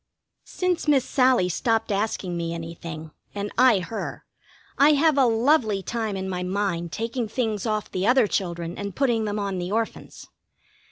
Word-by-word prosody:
Since 360 -3 -1
Miss 275 -4 +4
Sallie 255 -8 +3
stopped 225 +5 0
asking 200 -3 -1
me 170 0 -3
anything, 165 -1 -7 0.2
and 205 0 -3
I 245 -6 +5
her, 215 +5 -6 0.5
I 290 +2 +7
have 305 +1 +3
a 270 -3 +4
lovely 225 -4 +2
time 220 -1 -3
in 190 0 -4
my 180 -1 -3
mind 180 -3 -2
taking 230 +3 -3
things 220 -1 -2
off 215 -1 -2
the 185 +2 -1
other 250 -1 +5
children 175 -3 -3
and 200 -2 -5
putting 240 -5 +1
them 210 0 -2
on 200 -2 -2
the 180 +1 -4
Orphans. 225 +1 -3
210 Hz, 165 wpm, -24 LUFS, 185-245 Hz, 0.5 s, I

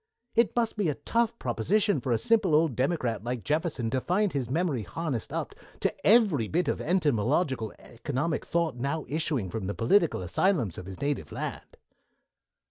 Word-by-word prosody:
It 230 0 +2
must 230 -2 0
be 200 -6 +1
a 145 - -1
tough 230 0 0
proposition 150 - +1
for 125 - -2
a 115 - +3
simple 195 - +3
old 155 -5 +3
Democrat 125 - 0
like 120 -2 -3
Jefferson 150 -7 -1
to 130 - 0
find 195 +5 +1
his 130 -5 -2
memory 155 -3 0
harnessed 140 - -4
up - - -3 0.3
to - - +1
every 200 - +4
bit 170 +4 0
of - - -1
entomological 140 - +1
economic 140 +6 -3
thought 170 -6 0
now 140 +5 -2
issuing 140 - -1
from 100 -2 -3
the 100 - -3
political 160 - +2
asylums 115 - +1
of 90 - -9
his 95 -1 -8
native 140 -1 -2
land." - - -6
145 Hz, 170 wpm, -28 LUFS, 120-175 Hz, 0.3 s, every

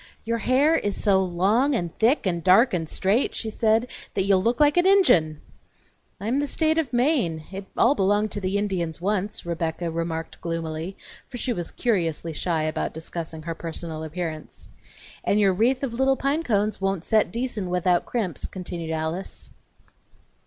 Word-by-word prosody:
"Your 230 +1 -1
hair 270 +8 +3
is 205 -9 -1
so 195 -2 +3
long 200 +10 +2
and 175 -7 -3
thick 235 +5 +3
and 170 -3 -1
dark 195 +7 +5
and 165 -3 -2
straight," 205 +7 +1
she 220 - -3
said, 220 +1 +2 0.3
"that 190 - +2
you'll 195 -1 +3
look 235 +4 0
like 295 -1 +5
an 355 +1 +4
Injun!" 175 - +4 0.8
"I 200 - -7
am 255 +5 +1
the 290 - 0
State 315 +2 +2
of 290 -7 -2
Maine; 240 - +1
it 195 0 -6
all 245 - +5
belonged 205 -2 +1
to 205 - -5
the 190 +1 0
Indians 180 -6 -2
once," 205 +2 -2
Rebecca 170 0 -2
remarked 165 0 -4
gloomily, 165 +1 -4 0.3
for 245 - -8
she 245 0 0
was 175 -4 -4
curiously 170 -8 -1
shy 160 0 -1
about 155 0 -2
discussing 160 0 -6
her 165 +1 -3
personal 165 -1 -6
appearance. 160 0 -6 0.5
"And 205 - +2
your 195 -2 +4
wreath 245 +8 +1
of 255 -4 -2
little 265 +2 +2
pine 280 +5 0
cones 210 -7 0
won't 195 -3 -1
set 215 +1 +2
decent 230 -5 -3
without 180 0 +1
crimps," 195 - -2
continued 175 -3 -6
Alice. 160 +4 -4
195 Hz, 175 wpm, -24 LUFS, 170-235 Hz, 0.8 s, dark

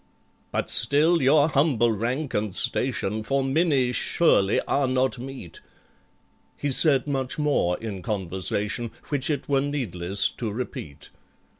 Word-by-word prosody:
"But - - -2
still 150 +8 +3
your 145 +3 +4
humble 135 -6 +2
rank 125 +7 -3
and 105 -2 -2
station 125 -4 0
For 135 +5 -1
MINNIE 135 -2 +1
surely 110 - +2
are 140 -1 0
not 130 -1 0
meet"— 130 -9 -9 1.0
He 145 - -2
said 135 -1 +4
much 135 -2 -3
more 145 -13 +1
in 105 -4 -6
conversation 100 +3 -3 0.2
Which 145 -1 0
it 150 - -2
were 140 -1 +2
needless 100 - 0
to 115 -3 -5
repeat. 100 - -7
130 Hz, 130 wpm, -24 LUFS, 105-140 Hz, 1.0 s, your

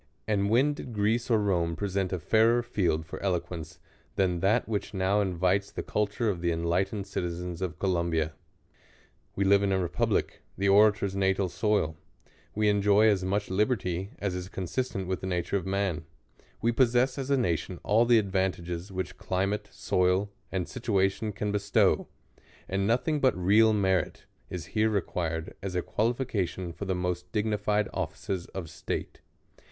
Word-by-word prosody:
And 100 -2 +1
when 130 +7 +4
did 130 -4 -8
Greece 110 +4 +1
or 115 - +4
Rome 90 -5 +1
present 100 -1 -1
a 95 - 0
fairei\ 115 +7 +3
field 85 -9 0
for - - -8
eloquence 90 -3 -3 0.4
than 90 -3 +1
that 105 +7 +2
which 105 -2 -3
now 95 +2 +2
invites 95 +1 +1
the - - -5
culture 105 +3 -1
of 95 -5 -1
the 85 -1 +1
enlightened 90 +5 0
citizens 90 -2 -4
of 90 -5 -3
Columbia? 85 -4 0 1.0
We 100 - +1
live 100 +1 +5
in 100 -1 +1
a 95 - +2
republic, 85 -5 -1 0.2
the 100 +2 +1
orator's 100 -1 +4
natal 95 -1 +1
soil; 95 -4 0 0.6
we 105 0 +2
enjoy 105 +1 +4
as 100 -3 +1
much 100 +1 -1
liberty, 95 -3 0
as 100 -2 -2
is 90 0 -5
consistent 95 +2 -3
widi 95 0 -1
the 95 - -5
nature 90 +1 -1
of 95 -2 -1
man; 95 -5 -1 0.6
we 115 - +3
possess 125 +2 +2
as 135 0 -4
a 140 - +3
nation 90 -5 -1
ail 110 +3 +5
the 120 0 +5
advantages 95 -3 -1
which 95 0 -4
climate, 100 +3 -1
soil, 90 +2 +1 0.2
ai^d 95 -3 -2
situation 105 -3 0
can 105 +1 -3
bestow; 100 0 +2 0.6
and 95 +2 0
nothi 125 +7 +1
ng 155 -1 +1
but 130 -8 +3
real 105 +5 +5
merit 95 -4 0 0.2
is 90 -3 -5
here 110 0 +3
required 85 -5 -2
as 95 -1 -4
a 90 - 0
qualification 105 -7 -1
for 100 - -6
the 95 -1 -1
most 90 0 -3
dignified 105 0 0
offices 90 -3 -3
of 95 -4 -6
state. 80 - -5
95 Hz, 165 wpm, -28 LUFS, 90-105 Hz, 1.0 s, live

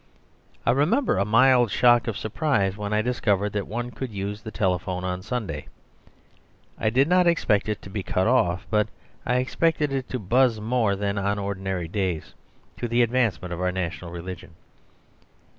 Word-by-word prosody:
I - - +4
remember 150 - +2
a 100 - +2
mild 120 +2 +5
shock 120 +2 +4
of 115 - -2
surprise 110 -5 0
when 105 0 -5
I 105 0 +2
discovered 105 -4 0
that 105 -1 -2
one 120 +3 -4
could 130 +1 -5
use 100 0 -5
the 110 - -7
telephone 90 -3 -1
on 90 0 -3
Sunday; 95 -9 -4 1.1
I 110 - +2
did 130 +5 +3
not 180 0 +4
expect 110 -12 +2
it 105 - -3
to - - -9
be 100 - -3
cut 95 0 0
off, 95 -7 +2
but 105 -1 +2 0.4
I 125 - +2
expected 150 +3 +1
it 135 -2 -3
to 130 - -2
buzz 120 +2 +2
more 110 -2 +1
than 100 0 -2
on 100 +1 0
ordinary 95 -3 -3
days, 90 -3 -3 0.4
to 120 - -3
the 120 +1 +3
advancement 115 -7 0
of 85 - -5
our 90 0 +1
national 90 -1 -4
religion. 85 0 -8
105 Hz, 175 wpm, -25 LUFS, 95-125 Hz, 1.1 s, mild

